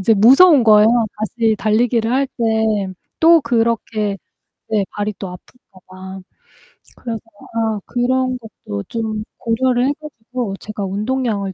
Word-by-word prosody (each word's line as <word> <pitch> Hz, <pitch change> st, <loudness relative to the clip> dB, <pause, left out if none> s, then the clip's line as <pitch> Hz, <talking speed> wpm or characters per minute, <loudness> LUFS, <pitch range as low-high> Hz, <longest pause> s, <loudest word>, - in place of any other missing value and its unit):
이제 220 Hz, +3 st, +3 dB
무서운 270 Hz, -, +7 dB
거예요. 215 Hz, -1 st, +6 dB, 0.3 s
다시 220 Hz, 0 st, 0 dB
달리기를 225 Hz, +2 st, +1 dB
할 270 Hz, +2 st, +2 dB
때 220 Hz, -4 st, 0 dB, 0.3 s
또 330 Hz, 0 st, +7 dB
그렇게 225 Hz, -4 st, -1 dB, 0.5 s
네 210 Hz, -3 st, +1 dB
발이 210 Hz, +1 st, -3 dB
또 195 Hz, -, -5 dB
아플까 185 Hz, +2 st, -15 dB
봐. 190 Hz, +1 st, -10 dB, 0.8 s
그래서 230 Hz, -2 st, -5 dB, 0.3 s
아 225 Hz, -2 st, -1 dB
그런 255 Hz, +1 st, 0 dB
것도 105 Hz, -, -8 dB
좀 220 Hz, -2 st, -3 dB
고려를 245 Hz, +2 st, +1 dB
해 -, -, +1 dB
가지고 245 Hz, -7 st, -6 dB
제가 210 Hz, -2 st, -5 dB
운동량을 210 Hz, 0 st, -2 dB
225 Hz, 260 characters per minute, -18 LUFS, 210-245 Hz, 0.8 s, 무서운